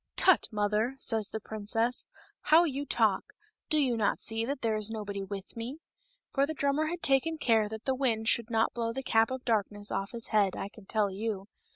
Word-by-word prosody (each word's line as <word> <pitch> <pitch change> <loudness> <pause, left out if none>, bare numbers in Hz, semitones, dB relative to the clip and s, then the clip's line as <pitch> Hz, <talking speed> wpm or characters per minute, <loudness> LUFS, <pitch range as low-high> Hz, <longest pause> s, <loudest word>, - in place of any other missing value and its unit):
" - - -62
Tut, 375 -3 +5
mother! 210 +4 0
says 220 -5 -1
the 220 - -4
princess, 220 +3 -1 0.2
" - - -34
how 320 +3 +8
you 285 -3 -2
talk! - - +1 0.4
do 310 - +4
you 265 -5 +3
not 215 -3 +1
see 225 0 +2
that 280 +2 -3
there 225 -1 +1
is 215 0 +1
nobody 205 -3 -4
with 195 0 -7
me 235 +5 -5 0.3
?*' - - -43
For 275 0 +2
the 315 - -4
drummer 280 +2 +1
had 345 +2 -4
taken 280 +4 +2
care 225 -7 +2
that 220 +1 -8
the 265 - +2
wind 235 -4 0
should 235 0 +2
not 225 -1 +1
blow 230 -1 -2
the 265 - -4
cap 225 -2 +3
of 260 -1 -5
darkness 205 -2 -1
off 195 +1 -2
of - - -18
his 230 -1 -3
head, 205 -4 +2
I 195 - -4
can 205 -2 -16
tell 210 -3 +1
you. 205 0 -4
225 Hz, 230 wpm, -30 LUFS, 210-270 Hz, 0.4 s, how